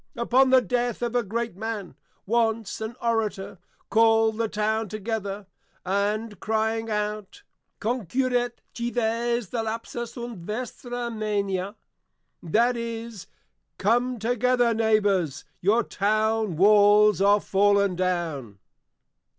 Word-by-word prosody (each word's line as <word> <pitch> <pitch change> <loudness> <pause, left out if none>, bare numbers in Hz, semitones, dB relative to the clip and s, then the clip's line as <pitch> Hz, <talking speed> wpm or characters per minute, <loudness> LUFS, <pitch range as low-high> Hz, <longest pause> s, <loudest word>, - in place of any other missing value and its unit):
Upon 255 +2 +3
the 260 -1 +5
Death 240 +2 -1
of 240 -1 -1
a 245 - +2
Great 230 0 -3
Man 215 -2 -5 0.3
once, 225 -1 0
an 220 +2 -4
Orator 205 -4 -1 0.3
call'd 225 0 +4
the 230 - +1
Town 215 0 -1
together, 210 -1 -4 0.4
crying 220 +3 -1
out, 210 - -3 0.4
Concurrite 245 +2 -1
Cives, 235 -2 -1
Dilapsa 230 +1 -3
sunt 235 -2 -7
vestra 240 +3 -5
Moenia! 200 -3 -2 0.7
that 230 +9 +2
is, 230 -3 -6 0.5
_Come 240 +4 +1
together, 245 +1 +2
Neighbours, 205 -9 +1
your 215 +6 +3
Town 215 -1 0
Walls 205 +1 +5
are 205 +1 +5
fallen 200 -1 +2
down! 170 - -2
220 Hz, 100 wpm, -25 LUFS, 205-235 Hz, 0.7 s, the